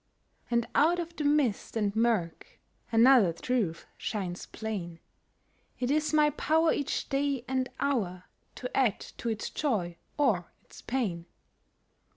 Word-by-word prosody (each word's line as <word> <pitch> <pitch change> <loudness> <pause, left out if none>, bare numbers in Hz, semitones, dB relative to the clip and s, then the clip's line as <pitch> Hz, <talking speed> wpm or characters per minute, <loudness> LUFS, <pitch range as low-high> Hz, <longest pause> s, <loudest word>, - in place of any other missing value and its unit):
And 235 -1 +1
out 330 +4 +4
of 340 -1 -5
the 305 - -3
mist 285 -8 +1
and 205 -2 0
murk 220 -8 0 0.3
Another 230 -4 +6
truth 180 -1 -1
shines 185 -5 -4
plain— 190 -7 -5 0.8
It 250 +1 0
is 305 +1 +1
my 300 -1 +4
power 320 +2 +2
each 285 - -2
day 275 -2 0
and 260 -1 0
hour 195 -10 -1 0.3
To 250 - -6
add 245 -6 +2 0.2
to 235 - -2
its 220 -1 -3
joy 190 - -1 0.2
or 220 - +1
its - - -14
pain. 195 -10 -2
235 Hz, 135 wpm, -29 LUFS, 195-280 Hz, 0.8 s, Another